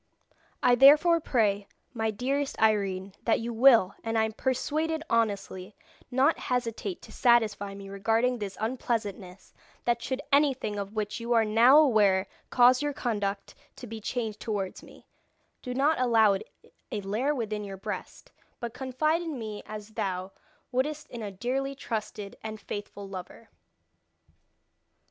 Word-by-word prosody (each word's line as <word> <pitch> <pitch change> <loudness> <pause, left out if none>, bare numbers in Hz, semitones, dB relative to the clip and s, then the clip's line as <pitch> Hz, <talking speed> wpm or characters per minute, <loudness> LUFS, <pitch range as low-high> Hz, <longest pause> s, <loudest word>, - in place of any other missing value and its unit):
I 245 - +5
therefore 300 +7 +7
pray, 205 -9 +1 0.3
my 220 -2 -1
dearest 270 +6 -2
Irene, 200 -3 +1
that 230 - +2
you 235 +1 -4
will, 230 -5 +6
and 225 0 -1
I 220 - +4
am 220 - -1
persuaded 305 +7 -1
honestly, 200 -3 -1 0.3
not 270 +5 +2
hesitate 250 - -2
to - - -12
satisfy 215 -5 +2
me 200 0 -9
regarding 225 +5 0
this 200 -2 -5
unpleasantness, 215 -5 -3 0.3
that 235 -1 +1
should 260 +3 -3
anything 270 -8 +2
of 200 +2 -6
which 210 +1 -2
you 235 +1 -1
are 225 -1 +4
now 230 +6 +6
aware 210 -10 +4 0.2
cause 250 +1 +5
your 290 0 -1
conduct 205 -6 -3 0.2
to 250 - -9
be 225 -1 -8
changed 220 -2 -3
towards 200 -4 -3
me, - - -16 0.6
do 250 - -6
not 285 +3 +2
allow 225 -4 +5
it 195 - -5 0.4
a 210 -4 -2
lair 225 +10 -1
within 215 -4 -3
your 195 -1 -7
breast, 190 - -7 0.3
but 235 -1 -5
confide 305 +6 0
in 325 -5 -4
me 215 -3 -6
as 210 0 -8
thou 190 -3 -3 0.4
wouldst 295 +4 -2
in 240 - -6
a 210 - -4
dearly 260 +7 -2
trusted 215 -5 -5
and 220 0 -6
faithful 205 0 -7
lover." 195 +4 -9
225 Hz, 150 wpm, -28 LUFS, 205-255 Hz, 0.6 s, therefore